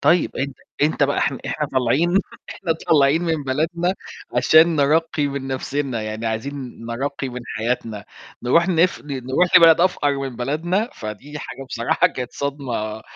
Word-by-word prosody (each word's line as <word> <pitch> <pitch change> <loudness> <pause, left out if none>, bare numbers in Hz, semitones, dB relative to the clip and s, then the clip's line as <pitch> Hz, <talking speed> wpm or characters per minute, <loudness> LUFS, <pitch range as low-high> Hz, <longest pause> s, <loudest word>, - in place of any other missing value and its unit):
طيب، 175 0 +2
أنت 135 0 -3 0.3
أنت 150 0 +2
بقى 140 0 +2
إحنا 135 -1 0
إحنا 150 - -2
طالعين 140 +8 +2 0.3
إحنا 170 -4 -2 0.2
طالعين 150 +1 +4
من 165 -3 -1
بلدنا 170 +7 0 0.4
عشان 160 +6 +5
نرقّي 155 +1 +2
من 140 -1 -4
نَفْسنا، 130 -2 -2
يعني 110 +1 -4
عايزين 125 +2 -5
نرقّي 135 +3 -3
من 125 0 -6 0.2
حياتنا، 110 -2 -2 0.4
نروح 170 +9 +3
نف 180 0 +2
ن 145 - -6
نروح 135 +8 +2
لبلد 165 -2 +7
أفقَر 145 -6 +2
من 135 -3 -5
بلدنا، 165 - -1
فدي 120 +8 -7
حاجة 135 - -8
بصراحة 115 -2 +2
كانت 125 -1 -5
صدمة 125 -7 -4
140 Hz, 150 wpm, -21 LUFS, 125-160 Hz, 0.4 s, لبلد